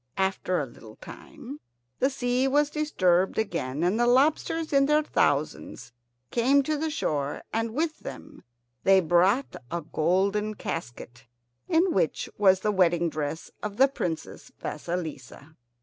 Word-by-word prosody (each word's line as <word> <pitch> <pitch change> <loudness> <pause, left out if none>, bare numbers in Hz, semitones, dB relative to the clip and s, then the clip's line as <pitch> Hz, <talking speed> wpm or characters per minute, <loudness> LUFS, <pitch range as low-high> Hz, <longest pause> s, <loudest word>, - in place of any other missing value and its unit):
After 190 -1 0
a 145 - -1
little 115 -3 -14
time 145 - -11 0.4
the 265 - +3
sea 255 -1 0
was 290 +2 +2
disturbed 190 - +1
again, 165 -9 -2
and 185 +6 +1
the 240 - +3
lobsters 305 +5 +2
in 275 0 +4
their 300 +1 +3
thousands 145 - -1 0.4
came 270 +4 +3
to 310 +3 -1
the 315 +2 -2
shore, 145 - -2
and 225 0 -2
with 315 +1 -1
them - - -10 0.4
they 195 0 +6
brought 185 - +2
a 170 - -3
golden 195 +7 0
casket 120 - -7 0.4
in 345 +3 +3
which - - 0
was 190 -2 +4
the 210 - +1
wedding 175 -3 +2
dress 155 +1 -4
of 210 -1 -5
the 270 +2 +6
Princess 170 - -5
Vasilissa. 155 -2 -6
195 Hz, 140 wpm, -26 LUFS, 165-270 Hz, 0.4 s, they